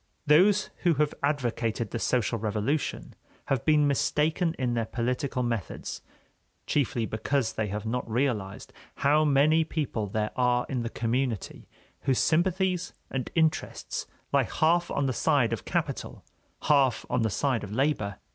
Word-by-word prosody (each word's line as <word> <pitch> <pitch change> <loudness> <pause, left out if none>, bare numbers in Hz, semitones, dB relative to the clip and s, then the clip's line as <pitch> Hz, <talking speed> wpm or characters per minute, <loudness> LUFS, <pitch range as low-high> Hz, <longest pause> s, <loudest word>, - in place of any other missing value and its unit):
Those 190 +7 +4
who 170 -3 +2
have 150 +1 +1
advocated 120 -6 -1
the 115 - -3
social 115 -1 0
revolution 110 +8 -2 0.4
have 135 -4 +1
been 150 -2 +4
mistaken 160 +4 +1
in 125 -2 0
their 115 -2 -1
political 125 +1 -1
methods, 115 - -4 0.6
chiefly 130 -5 0
because 115 +3 -1
they 110 - -1
have 105 +2 -4
not 120 +1 -2
realized 110 -5 -2 0.3
how 150 +2 +5
many 150 +2 +4
people 145 -9 -2
there 105 +2 -2
are 125 -1 +2
in 130 -3 -1
the 115 - -3
community 120 -1 -2 0.3
whose 130 -2 +1
sympathies 180 +1 +1 0.2
and 130 -3 -3
interests 160 -1 -1 0.3
lie - - +5
half 170 +2 +1
on 140 - 0
the 130 - 0
side - - +2
of - - -5
capital, - - -3 0.4
half 140 -4 +3
on 125 - 0
the 110 - +1
side 125 +3 0
of 100 - -7
labor. 110 -5 0
130 Hz, 145 wpm, -27 LUFS, 115-150 Hz, 0.6 s, how